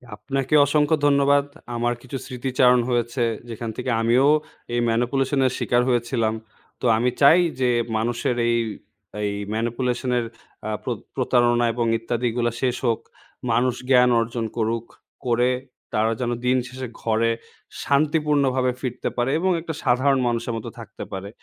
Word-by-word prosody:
আপনাকে 135 Hz, +6 st, -3 dB
অসংখ্য 150 Hz, +2 st, +2 dB
ধন্যবাদ। 140 Hz, 0 st, +4 dB, 0.3 s
আমার 120 Hz, +1 st, 0 dB
কিছু 130 Hz, +2 st, -6 dB
স্মৃতিচারণ 125 Hz, 0 st, +2 dB
হয়েছে। 120 Hz, 0 st, 0 dB, 0.3 s
যেখান 115 Hz, 0 st, -5 dB
থেকে 125 Hz, +1 st, -3 dB
আমিও 120 Hz, +4 st, +4 dB, 0.5 s
এই 120 Hz, -, +1 dB
ম্যানিপুলেশন 130 Hz, +4 st, +1 dB
এর 130 Hz, -, +2 dB
শিকার 120 Hz, 0 st, +2 dB
হয়েছিলাম। 120 Hz, -2 st, +1 dB, 0.5 s
তো -, -, -3 dB
আমি 125 Hz, +2 st, +2 dB
চাই 155 Hz, +5 st, +7 dB, 0.2 s
যে 125 Hz, -1 st, +2 dB, 0.3 s
মানুষের 120 Hz, +2 st, -1 dB
এই 120 Hz, -, +2 dB, 0.7 s
এই 100 Hz, -, 0 dB, 0.2 s
ম্যানিপুলেশনের 120 Hz, +1 st, -1 dB, 0.4 s
আ -, -, -2 dB
প্রত -, -, -3 dB, 0.2 s
প্রতারণা 120 Hz, -1 st, +2 dB
এবং 120 Hz, 0 st, -1 dB
ইত্যাদিগুলা 120 Hz, +1 st, -1 dB
শেষ 125 Hz, -2 st, +1 dB
হোক। 115 Hz, -, +1 dB, 0.5 s
মানুষ 120 Hz, +2 st, +2 dB
জ্ঞান 125 Hz, -1 st, +6 dB
অর্জন 115 Hz, 0 st, -2 dB
করুক। 115 Hz, +1 st, -1 dB, 0.4 s
করে 120 Hz, +1 st, +3 dB, 0.4 s
তারা 110 Hz, +1 st, +2 dB
যেন 120 Hz, -1 st, -1 dB
দিন 130 Hz, +1 st, +3 dB
শেষে 130 Hz, 0 st, -6 dB
ঘরে 115 Hz, +1 st, +1 dB, 0.5 s
শান্তিপূর্ণভাবে 140 Hz, -3 st, +2 dB
ফিরতে 125 Hz, -2 st, -3 dB
পারে 120 Hz, +2 st, +1 dB
এবং 185 Hz, +2 st, +1 dB
একটা 160 Hz, -1 st, -5 dB
সাধারণ 130 Hz, +1 st, +3 dB
মানুষের 115 Hz, 0 st, -1 dB
মতো 110 Hz, -, -6 dB
থাকতে -, -, -9 dB
পারে। 95 Hz, +1 st, -5 dB
125 Hz, 140 wpm, -23 LUFS, 115-130 Hz, 0.7 s, চাই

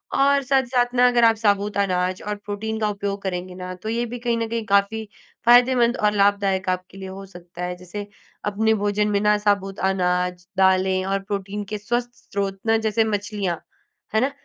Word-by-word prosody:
और 280 Hz, +1 st, +4 dB
साथ-साथ 250 Hz, -2 st, +1 dB
ना, 250 Hz, 0 st, +6 dB
अगर 245 Hz, -1 st, +3 dB
आप 225 Hz, -1 st, +5 dB
साबूत 205 Hz, -1 st, +1 dB
अनाज 185 Hz, -2 st, 0 dB
और 210 Hz, -, -1 dB
प्रोटीन 220 Hz, +2 st, -3 dB
का 215 Hz, -1 st, +1 dB
उपयोग 200 Hz, -1 st, -3 dB
करेंगे 180 Hz, -1 st, -4 dB
ना, 185 Hz, 0 st, -6 dB
तो 185 Hz, +4 st, -7 dB
ये 235 Hz, +1 st, 0 dB
भी 240 Hz, +1 st, -6 dB
कहीं 235 Hz, -1 st, 0 dB
न 230 Hz, -, -1 dB
कहीं 230 Hz, -1 st, -2 dB
काफ़ी 200 Hz, +2 st, +2 dB, 0.4 s
फ़ायदेमंद 245 Hz, 0 st, +5 dB
और 210 Hz, 0 st, +2 dB
लाभदायक 200 Hz, -2 st, +2 dB
आपके 185 Hz, +1 st, -3 dB
लिए 190 Hz, 0 st, -7 dB
हो 195 Hz, +1 st, -8 dB
सकता 180 Hz, -2 st, -10 dB
है। 180 Hz, -, -4 dB
जैसे 200 Hz, +3 st, -7 dB, 0.4 s
अपने 220 Hz, +2 st, +2 dB
भोजन 205 Hz, +1 st, +1 dB
में 200 Hz, -, +2 dB
ना, 210 Hz, 0 st, +4 dB
साबूत 200 Hz, -2 st, 0 dB
अनाज, 180 Hz, -1 st, -1 dB
दालें 190 Hz, 0 st, +3 dB
और 195 Hz, +1 st, 0 dB
प्रोटीन 200 Hz, +1 st, -4 dB
के 210 Hz, -, -1 dB
स्वस्थ 240 Hz, +4 st, -2 dB, 0.2 s
स्रोत 195 Hz, -1 st, -2 dB
ना, 225 Hz, 0 st, +4 dB
जैसे 220 Hz, 0 st, +1 dB
मछलियाँ, 205 Hz, -5 st, -2 dB, 0.6 s
है 220 Hz, -, +4 dB
ना? 270 Hz, -, +1 dB
205 Hz, 190 wpm, -23 LUFS, 190-225 Hz, 0.6 s, ना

